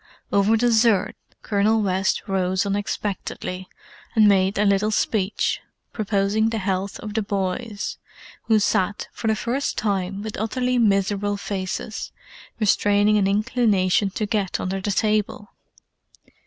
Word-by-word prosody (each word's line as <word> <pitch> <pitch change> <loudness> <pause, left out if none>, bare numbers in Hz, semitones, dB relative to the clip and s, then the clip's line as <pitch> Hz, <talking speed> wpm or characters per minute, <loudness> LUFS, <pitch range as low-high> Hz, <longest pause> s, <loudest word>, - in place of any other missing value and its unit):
Over 205 +3 +4
dessert, 225 -3 +3 0.3
Colonel 215 +2 +2
West 190 +1 0
rose 190 0 0
unexpectedly, 200 -2 -3 0.5
and 215 -2 +6
made 195 0 +3
a 210 - +2
little 200 +1 +2
speech, 210 -2 0 0.3
proposing 210 0 +1
the 225 - -2
health 190 -1 -2
of 210 -1 -6
the 220 - 0
boys, 200 +2 -3 0.5
who 220 - +4
sat, 205 -1 0
for 225 - -4
the 220 - +3
first 245 +6 -2
time, 195 -1 -1
with 215 -1 -5
utterly 250 +3 0
miserable 205 -1 +1
faces, 195 +1 -4 0.5
restraining 205 0 +3
an 195 - +2
inclination 205 -2 +2
to 215 - -1
get 205 -3 -1
under 190 +1 -3
the 205 - -2
table. 210 0 -1
205 Hz, 130 wpm, -23 LUFS, 195-220 Hz, 0.5 s, and